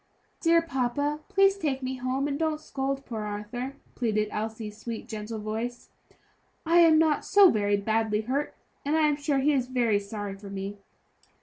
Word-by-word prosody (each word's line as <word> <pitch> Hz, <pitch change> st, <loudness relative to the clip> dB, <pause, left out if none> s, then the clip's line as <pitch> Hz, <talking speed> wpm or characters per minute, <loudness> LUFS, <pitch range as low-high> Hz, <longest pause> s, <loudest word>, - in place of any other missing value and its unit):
"Dear 335 Hz, 0 st, +4 dB
papa, 285 Hz, 0 st, -1 dB
please 390 Hz, -1 st, +4 dB
take 275 Hz, -6 st, -1 dB
me 260 Hz, 0 st, -3 dB
home, 255 Hz, +2 st, -1 dB
and 285 Hz, 0 st, -2 dB
don't 315 Hz, -1 st, 0 dB
scold 275 Hz, -2 st, -3 dB
poor 225 Hz, -3 st, -5 dB
Arthur," 210 Hz, +6 st, -5 dB, 0.2 s
pleaded 215 Hz, -3 st, 0 dB
Elsie's 215 Hz, 0 st, -5 dB
sweet, 230 Hz, 0 st, -6 dB
gentle 220 Hz, 0 st, -5 dB
voice; 220 Hz, +3 st, -4 dB, 0.8 s
"I 335 Hz, +2 st, +5 dB
am 325 Hz, -2 st, +7 dB
not 310 Hz, -2 st, +3 dB
so 400 Hz, -2 st, +6 dB
very 205 Hz, -1 st, +1 dB
badly 220 Hz, +1 st, 0 dB
hurt, 265 Hz, +6 st, -2 dB, 0.3 s
and 290 Hz, +2 st, 0 dB
I 310 Hz, -1 st, +4 dB
am 295 Hz, -, +2 dB
sure 290 Hz, -1 st, 0 dB
he 285 Hz, +3 st, +3 dB
is 255 Hz, -3 st, +1 dB
very 240 Hz, -5 st, +2 dB
sorry 205 Hz, -1 st, -6 dB
for 200 Hz, 0 st, -11 dB
me." 200 Hz, +1 st, -5 dB
250 Hz, 175 wpm, -27 LUFS, 215-295 Hz, 0.8 s, am